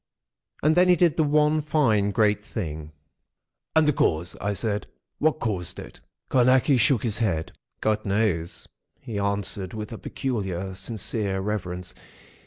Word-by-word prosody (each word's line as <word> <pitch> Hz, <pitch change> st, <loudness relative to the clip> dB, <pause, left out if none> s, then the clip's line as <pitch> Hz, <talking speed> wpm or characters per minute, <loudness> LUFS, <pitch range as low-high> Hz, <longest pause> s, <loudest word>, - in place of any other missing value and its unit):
And 155 Hz, +2 st, +4 dB
then 180 Hz, +1 st, +5 dB
he 180 Hz, -, +7 dB
did 170 Hz, -2 st, +3 dB
the 160 Hz, -, +3 dB
one 150 Hz, +1 st, +3 dB
fine, 125 Hz, -10 st, +2 dB
great 105 Hz, 0 st, +2 dB
thing!" 80 Hz, -8 st, -5 dB, 0.8 s
"And 160 Hz, -1 st, +5 dB
the 150 Hz, -, +4 dB
cause?" 85 Hz, -6 st, 0 dB
I 105 Hz, +2 st, 0 dB
said. 105 Hz, +1 st, -2 dB, 0.3 s
"What 155 Hz, 0 st, +2 dB
caused 95 Hz, -6 st, -3 dB
it?" -, -, -10 dB, 0.3 s
Carnacki 130 Hz, +2 st, +4 dB
shook 125 Hz, -2 st, +3 dB
his 110 Hz, -2 st, -1 dB
head. 80 Hz, -8 st, -1 dB, 0.3 s
"God 110 Hz, 0 st, +1 dB
knows," 95 Hz, -5 st, -1 dB, 0.3 s
he 110 Hz, -4 st, -5 dB
answered, 100 Hz, -1 st, -1 dB
with 105 Hz, +1 st, -6 dB
a 115 Hz, -, -7 dB
peculiar 95 Hz, -8 st, -3 dB
sincere 100 Hz, -1 st, -2 dB
reverence. 90 Hz, -3 st, -4 dB
105 Hz, 145 wpm, -25 LUFS, 95-130 Hz, 0.8 s, he